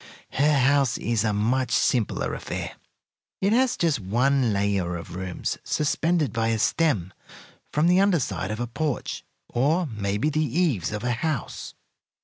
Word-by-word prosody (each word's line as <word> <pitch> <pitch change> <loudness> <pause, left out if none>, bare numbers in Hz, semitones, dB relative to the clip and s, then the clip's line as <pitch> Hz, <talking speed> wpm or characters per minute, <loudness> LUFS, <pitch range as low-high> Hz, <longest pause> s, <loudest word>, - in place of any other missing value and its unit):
Her 145 +1 +3
house 135 -1 +3
is 115 -3 0
a 110 - +1
much 120 +5 +1
simpler 120 -1 +1
affair. - - -5 0.7
It 200 +2 +2
has 255 +1 +2
just 165 -7 +1
one 120 +5 +2
layer 100 -3 0
of 85 -1 -8
rooms 95 -1 -4
suspended 155 -3 0
by 115 -1 0
a 115 0 +1
stem 110 - +1 0.6
from 150 +2 +2
the 180 +1 +5
under 195 -3 +4
side 95 -7 -3
of 110 +1 -4
a 120 - -1
porch, 145 +3 -3 0.2
or 155 +9 +1
maybe 105 +2 -1
the 155 +1 +1
eaves, 140 - 0
of 105 +1 -4
a 125 - 0
house." 125 +1 -3
125 Hz, 155 wpm, -25 LUFS, 105-155 Hz, 0.7 s, the